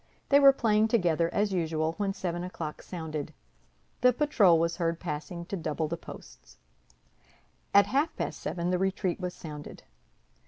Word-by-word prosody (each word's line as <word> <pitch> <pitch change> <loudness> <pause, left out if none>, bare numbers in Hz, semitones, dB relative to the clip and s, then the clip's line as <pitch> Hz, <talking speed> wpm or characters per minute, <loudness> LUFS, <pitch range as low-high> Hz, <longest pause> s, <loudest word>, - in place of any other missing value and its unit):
They 280 - +6
were 275 -1 +9
playing 220 -4 +2
together, 170 -7 +1
as 205 -1 0
usual, 160 -2 0
when 200 -2 0
seven 175 -2 -3
o'clock 180 -4 -6
sounded; 155 -4 -6 0.7
the 250 - +6
patrol 235 - +4
was 165 +1 0
heard 165 -1 -1
passing 170 +2 -5
to 200 - -4
double 160 -2 -2
the 165 - -3
posts. - - -13 1.1
At 200 0 +6
half 290 +5 0
past - - -4
seven 175 0 -2
the 180 - +1
retreat 190 -1 -1
was 180 -1 -4
sounded. 150 -2 -9
175 Hz, 155 wpm, -29 LUFS, 160-205 Hz, 1.1 s, were